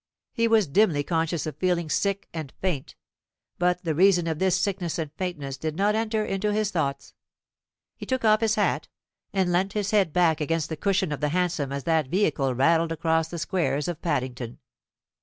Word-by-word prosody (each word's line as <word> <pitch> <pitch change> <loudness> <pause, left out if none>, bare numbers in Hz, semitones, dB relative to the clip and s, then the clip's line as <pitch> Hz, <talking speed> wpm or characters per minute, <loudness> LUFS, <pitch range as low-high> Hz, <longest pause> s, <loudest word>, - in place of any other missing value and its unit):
He 230 0 +2
was 225 -3 +4
dimly 155 -1 +2
conscious 165 0 -1
of 155 - -5
feeling 175 -3 0
sick 200 +5 -1
and 155 -5 -5
faint, 175 -8 -3 0.6
but 180 0 +1
the 165 -2 0
reason 175 +1 +4
of 160 -2 -2
this 190 -1 +2
sickness 185 -5 -1
and 155 -3 -3
faintness 150 -8 -4
did 155 +1 -3
not 200 +4 +2
enter 220 -1 0
into 200 +1 -1
his 210 0 0
thoughts. 140 -6 -2 0.8
He - - -9
took 260 -3 -1
off 215 0 +5
his 220 -1 +2
hat, - - 0 0.4
and 190 -3 +1
leant 190 +3 +1
his 205 -1 -1
head 200 -6 +3
back 165 -2 +2
against 160 +1 -1
the 160 - -3
cushion 190 +1 0
of 150 - -3
the 150 - +1
hansom 175 -4 -1
as 140 0 -3
that 160 -2 +1
vehicle 140 -7 +1
rattled 165 +5 +3
across 160 0 +1
the 170 - -6
squares 160 -4 -1
of 175 -3 -4
Paddington. 130 -7 -3
170 Hz, 190 wpm, -26 LUFS, 155-195 Hz, 0.8 s, off